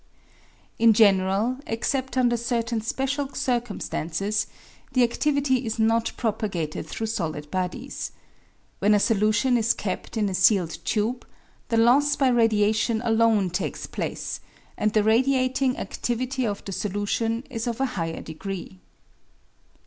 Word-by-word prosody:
In 230 -1 +6
general, 205 +3 +3
except 260 +3 -2
under 245 -2 +3
certain 235 -1 -1
special 270 +4 -2
circumstances, 215 -5 -1 0.5
the 250 -2 +4
adivity 275 0 +1
is 225 -1 -3
not 225 +1 +2
propagated 200 -9 -2
through 225 - -4
solid 160 -9 -3
bodies. 185 +9 -3 0.7
When 210 +2 +4
a - - +4
solution 225 +4 +2
is 230 0 +2
kept 200 +3 -4
in 210 -2 +2
a 195 - -2
sealed 185 -2 +3
tube, 230 +3 0 0.5
the 230 - +1
loss 265 +6 +4
by 270 -2 +3
radiation 220 -1 +2
alone 225 -5 +3
takes 175 - -3
place, - - -4 0.4
and 215 - +1
the 215 -1 +3
radiating 255 +3 +2
adivity 255 +1 -2
of 200 - -6
the 195 - -5
solution 210 +4 -1
is 230 +1 -3
of 235 0 -2
a 270 - +2
higher 165 -3 -3
degree. 160 - -7
225 Hz, 130 wpm, -25 LUFS, 205-245 Hz, 0.7 s, In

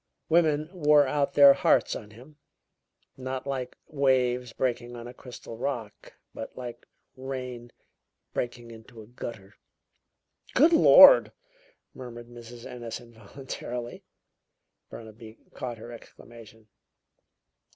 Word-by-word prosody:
Women 155 -2 +2
wore 150 -4 +4
out 140 +1 -1
their 140 -1 +9
hearts - - +2
on 105 - -9
him, 125 +8 -16 0.8
not 130 0 -5
like 130 -2 -5
waves 125 -4 0
breaking 120 -1 -3
on 120 0 -9
a 120 - -10
crystal 125 -2 -11
rock, 120 -6 -5 0.2
but 110 - -9
like 120 -1 -9 0.3
rain 125 -2 -7 0.6
breaking 120 -1 -5
into 115 0 -13
a - - -15
gutter." 110 -3 -9 1.0
"Good 315 +6 +5
Lord!" - - +8 0.6
murmured 120 -2 -10
Mrs. 120 0 -12
Ennis 120 -2 -7
involuntarily. 120 +1 -8 0.9
Burnaby 110 0 -12 0.2
caught 120 -2 -6
her 115 +2 -11
exclamation. 115 -1 -15
120 Hz, 110 wpm, -27 LUFS, 115-130 Hz, 1.0 s, their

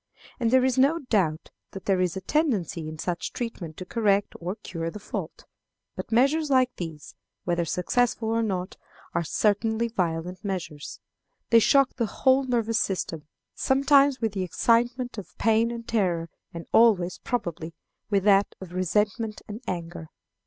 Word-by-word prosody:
And 235 -2 +1
there 260 +1 +4
is 260 0 +1
no 285 +5 +4
doubt 170 -7 +1 0.2
that 195 - -8
there 190 -2 +2
is 180 0 0
a - - -4
tendency 190 - 0
in 155 - -8
such 175 +2 -3
treatment 185 -10 -5
to 185 - -7
correct 205 -1 +1
or 180 +3 -4
cure 165 -6 -5
the 190 - -8
fault. 210 - -6 0.5
But - - -7
measures 280 +6 +3
like 255 -2 +3
these, 160 -4 -7 0.3
whether 170 -1 0
successful 225 +7 0
or 230 0 +1
not, 190 -4 -3 0.4
are 170 - 0
certainly 220 +6 +1
violent 180 -2 -2
measures. 175 -7 -5 0.5
They 230 - +8
shock 275 +4 +3
the 230 -3 0
whole 265 +4 +2
nervous 230 -3 +1
system, 165 -5 -2 0.3
sometimes 275 0 +3
with 225 -3 -1
the 195 - -2
excitement 235 +6 +1
of 195 - -12
pain 225 +1 +3
and 235 -1 -7
terror, 175 -7 0 0.2
and 170 -1 -8
always, 200 -6 +4
probably, 170 -8 -4 0.3
with 200 -3 +2
that 200 -1 +4
of 185 -2 -10
resentment 210 +4 -1
and 215 +3 -7
anger. 170 -2 -5
205 Hz, 160 wpm, -26 LUFS, 175-235 Hz, 0.5 s, They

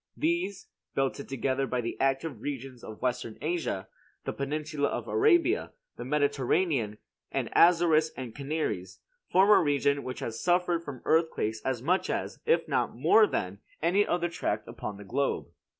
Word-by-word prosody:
These, 315 - -1 0.3
belted 135 +1 -1
together 135 0 -1
by 125 - -1
the 115 - -4
active 135 -2 0
regions 135 -3 -6
of 110 +2 -9
Western 125 -3 -2
Asia, 155 - -2 0.4
the - - -3
peninsula 150 +1 -2
of - - -4
Arabia, 400 -1 +3 0.2
the - - -6
Mediterranean, 140 - +1 0.3
and - - -2
Azores 165 -2 +5
and 125 -4 -6
Canaries, 140 - -3 0.3
form 195 +3 +5
a - - +7
region 140 -1 +2
which 130 - -5
has 115 0 -4
suffered 175 -1 +2
from 140 -6 -8
earthquakes 155 -9 +1
as 130 -2 -2
much 180 +6 +1
as, - - -3
if 475 - +3
not - - 0
more 220 -1 +6
than, 95 - -3 0.2
any 180 +6 +3
other 175 -3 0
tract 110 -10 -2
upon 105 -2 -6
the 100 - -10
globe. 135 +7 -1
145 Hz, 155 wpm, -29 LUFS, 125-175 Hz, 0.4 s, a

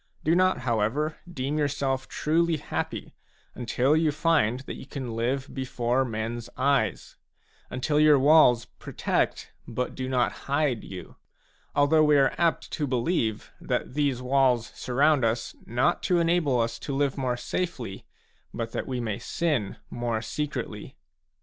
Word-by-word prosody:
Do 160 - +3
not, 185 -3 +3
however, 125 +6 0
deem 140 0 -2
yourself 135 -2 -1
truly 165 +1 +1
happy - - -4 0.4
until 125 +4 +1
you 160 -1 +3
find 145 -6 +2
that - - -7
you - - -10
can 130 -6 -5
live 130 +4 -2
before 125 -1 0
men's 115 0 -4
eyes, 130 -8 0 0.5
until 145 +4 0
your 150 -1 +6
walls 135 -4 +5
protect - - -2 0.2
but 125 +2 -3
do 130 0 -4
not 125 -2 +2 0.2
hide 140 -5 +1
you; 95 -2 -9 0.6
although 150 +2 +4
we 150 -1 +5
are 135 -1 +4
apt 170 -1 +1
to 150 - -2
believe 120 - -1
that - - -2
these 140 -3 0
walls 125 -3 +2
surround 140 +2 +2
us, 115 +1 -1
not 125 +9 +1
to 180 - +2
enable 165 -6 +2
us 115 0 -1
to 140 - -4
live 140 -1 +1
more 130 -3 -1
safely, 120 - -4 0.4
but 115 -1 -4
that - - -4
we 130 -2 -2
may 110 -4 -3
sin 145 - -1
more 120 -2 -1
secretly. 150 +5 -4
130 Hz, 145 wpm, -27 LUFS, 120-150 Hz, 0.6 s, your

